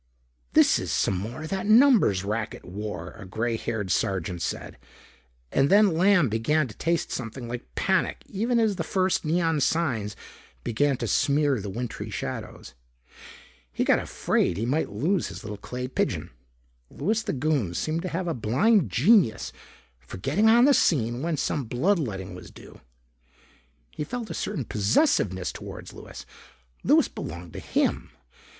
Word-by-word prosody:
"This - - +5
is - - -4
some 95 - +1
more 115 +11 -5
of 160 - -6
that 195 +2 -2
numbers 220 - +5
racket 110 +2 -4
war," 105 +3 -6
a - - -8
gray 110 +5 -2
haired 110 -4 -3
sergeant 90 -2 -1
said. - - -4 0.7
And 135 +1 +3
then 205 -2 +5
Lamb 180 -3 +4
began 125 +7 +1
to 105 - -12
taste 170 +1 -1
something 120 0 -5
like 115 - -7
panic - - 0
even 235 +4 0
as 215 -4 +1
the 165 - -1
first 185 +2 0
neon 165 -1 +1
signs 125 -10 0 0.5
began 140 +4 +1
to 120 - -3
smear 140 -1 +2
the 100 - -5
wintry 120 +3 -5
shadows. 65 - -6 1.0
He - - -1
got - - +4
afraid 85 - 0
he 110 - -1
might 145 +6 0
lose 160 - 0
his - - -9
little 105 0 -5
clay 125 +5 -6
pigeon. 130 - -2 0.6
Louis 215 +10 -1
the 220 -3 -3
Goon 135 - 0
seemed 155 - -1
to 185 - -4
have 175 +2 -3
a 165 - 0
blind 135 - +2
genius 130 - +3 0.5
for 60 +9 -10
getting 165 - +2
on 235 +2 +6
the 285 - +6
scene 120 - +2
when 165 0 -1
some 140 -1 -1
blood 170 - +1
letting 95 - -4
was - - -10
due. - - -15 1.1
He - - -4
felt 230 +8 -5
a - - -3
certain 170 - -3
possessiveness 100 - +1
toward - - -9
Louis. - - -10 0.6
Louis - - +4
belonged 85 +1 -8
to - - -6
him. - - -1
135 Hz, 160 wpm, -26 LUFS, 110-180 Hz, 1.1 s, on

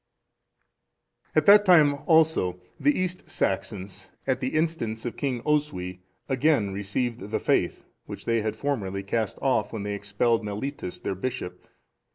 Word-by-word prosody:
] - - -43
At - - +4
that 205 0 +8
time, 160 -7 +6
also, 160 - +3 0.2
the 290 0 +3
East 185 0 -3
Saxons, 95 0 -3 0.2
at 130 -1 +1
the 130 +2 -2
instance 155 -9 -1
of 120 - -3
King 125 -4 -2
Oswy, 120 -13 -1 0.3
again 130 -7 +2
received 105 +2 -3
the 110 - -1
faith, - - 0 0.2
which - - -8
they 115 -1 +2
had 110 0 -2
formerly 100 -9 -2
cast 110 +1 -1
off 135 -2 +1
when 110 -3 -4
they 105 0 -2
expelled 100 +3 0
Mellitus, 105 0 -4
their - - -2
bishop. 95 -4 -5
115 Hz, 150 wpm, -26 LUFS, 100-145 Hz, 0.3 s, that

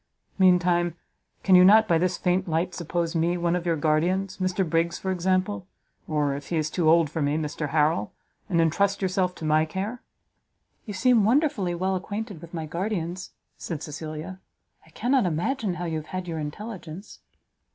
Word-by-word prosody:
Meantime, 175 -2 +3 0.5
can 190 - +3
you 180 0 +9
not, 215 +3 +7
by 165 -3 +3
this 180 +1 0
faint 185 +1 0
light, 170 +3 -1
suppose 170 0 -2
me 170 +2 +1
one 170 0 +1
of 175 0 -3
your 165 - +2
guardians, 175 +5 0
Mr 185 0 0
Briggs, 165 +2 0
for 190 - -3
example, 185 +1 0 0.4
or, 150 -2 0
if 140 0 -8
he 170 - 0
is 155 0 -1
too 170 -4 +2
old 165 0 +5
for 160 +2 -4
me, 145 +1 +1
Mr 150 -1 -3
Harrel, 150 -8 +1 0.4
and 170 -3 +2
entrust 195 +5 +2
yourself 185 -1 0
to 160 - -7
my 155 0 +3
care?" 195 +9 -4 0.9
"You 205 - -5
seem 240 +1 +4
wonderfully 220 - +2
well 190 +2 0
acquainted 205 -1 -5
with 170 -1 -11
my 160 -2 -4
guardians," 180 +1 -3 0.3
said 160 -4 -5
Cecilia; 155 +4 -6 0.4
"I - - -21
cannot 250 -4 +1
imagine 185 - -1
how 175 0 -4
you 165 -2 -2
have 155 0 -7
had 185 +1 -5
your 165 -2 -3
intelligence." 180 +3 -7
175 Hz, 180 wpm, -25 LUFS, 160-190 Hz, 0.9 s, you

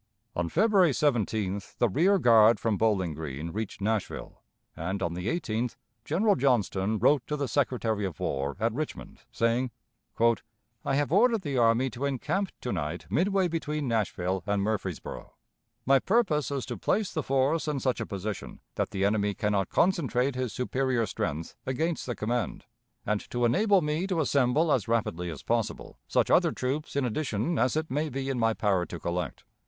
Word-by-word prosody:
On 85 -1 -1
February 190 - +4
17th 110 -8 -1
the 120 - +3
rear 180 - +3
guard 115 - +6
from 115 -2 +1
Bowling 95 -6 +1
Green 75 +1 -5
reached 110 +1 -5
Nashville, 110 0 -3 0.3
and 95 +5 -3
on 85 - -1
the 90 +3 -4
18th 120 -6 -1 0.3
General 200 - +2
Johnston 110 -5 +1
wrote 145 +6 +4
to 150 - -2
the 140 -2 -1
Secretary 115 -5 0
of 90 -8 -4
War 70 0 -2
at 115 0 +1
Richmond, 155 +4 -5
saying: 115 +2 +1 0.5
"I 115 +1 -1
have 145 0 0
ordered 225 +2 +4
the 140 -4 -1
army 120 +3 +3
to 125 +6 -4
encamp 150 - -1
to 125 - -3
night 80 -1 -3
midway 190 +2 +2
between 150 -3 -2
Nashville 95 -5 -1
and 100 -1 +1
Murfreesboro. 100 -5 -4 0.5
My 135 +1 +5
purpose 175 - +1
is 140 -3 -2
to 120 -3 -5
place 200 - 0
the 155 - 0
force 135 +4 +1
in 150 -2 0
such 130 -2 0
a - - -2
position 100 -1 -5
that - - -1
the 95 0 -1
enemy 100 -1 +1
can 105 - 0
not 100 -3 0
concentrate 140 -7 +2
his 125 -2 -2
superior 125 0 0
strength 80 -5 -4
against 160 +5 -1
the 120 - -2
command, 120 +2 -2 0.4
and 105 0 0
to 120 0 0
enable 195 - +3
me 155 +5 -1
to 185 -4 0
assemble 145 +2 +2
as 120 -8 +1
rapidly 90 -7 -1
as 80 -4 -7
possible - - -2
such - - +1
other - - +5
troops 140 +4 -3
in 140 -2 +1
addition 125 +3 -1
as 125 +5 +2
it 160 -2 -2
may 150 +3 0
be 135 0 -3
in 130 - -2
my 115 -1 +2
power 95 -4 +1
to 85 - -7
collect. 85 -1 -3
120 Hz, 175 wpm, -28 LUFS, 105-150 Hz, 0.5 s, guard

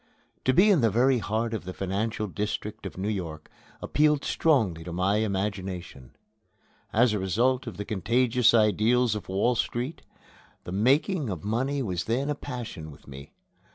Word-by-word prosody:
To 130 - +4
be 195 +9 +6
in 175 -8 +4
the 115 - +4
very 125 +4 +3
heart 110 +2 -2
of 110 - -3
the 95 +1 -7
financial 105 +3 -2
district 105 +1 -4
of 90 - -11
New 95 - -3
York 85 -7 -4 0.3
appealed 150 -1 +2
strongly 110 - +1
to 85 - -7
my 95 +4 +1
imagination. 95 - -3 0.8
As 115 +1 +3
a 105 - 0
result 120 +8 +1
of 115 - -6
the 105 - -4
contagious 115 +4 +2
ideals 115 +2 +3
of 105 -3 -6
Wall 100 +6 +2
Street, 125 +6 -3 0.6
the - - -7
making 135 - +2
of 90 -6 -5
money 130 +6 -1
was 90 -5 -2
then 135 +6 0
a - - -1
passion 120 - -7
with 70 - -15
me. 70 +1 -11
110 Hz, 165 wpm, -27 LUFS, 95-125 Hz, 0.8 s, be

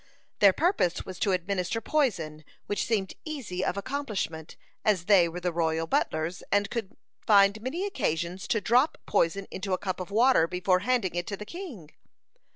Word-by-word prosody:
Their 200 -1 +7
purpose 305 - +1
was 185 -2 -8
to 200 - +1
administer 185 +3 -1
poison, 190 - -1 0.2
which 205 - -1
seemed 200 -5 0
easy 245 - -4
of 195 - -1
accomplishment, 200 - -4 0.3
as 195 -5 +2
they 185 -4 +5
were 175 +2 -6
the 180 -1 -2
royal 165 -1 0
butlers, 160 +1 -1
and 205 0 +2
could 225 -1 -4 0.3
find 200 0 +5
many 310 - -3
occasions 185 - -2
to 225 - +1
drop 250 - +3
poison 195 +4 +1
into 190 0 -3
a - - +2
cup 185 0 -4
of 185 - -5
water 225 -5 +4
before 180 +1 +1
handing 235 -4 0
it 175 0 -3
to 200 - -4
the 210 - -7
king. 265 - -9
195 Hz, 170 wpm, -28 LUFS, 175-225 Hz, 0.3 s, Their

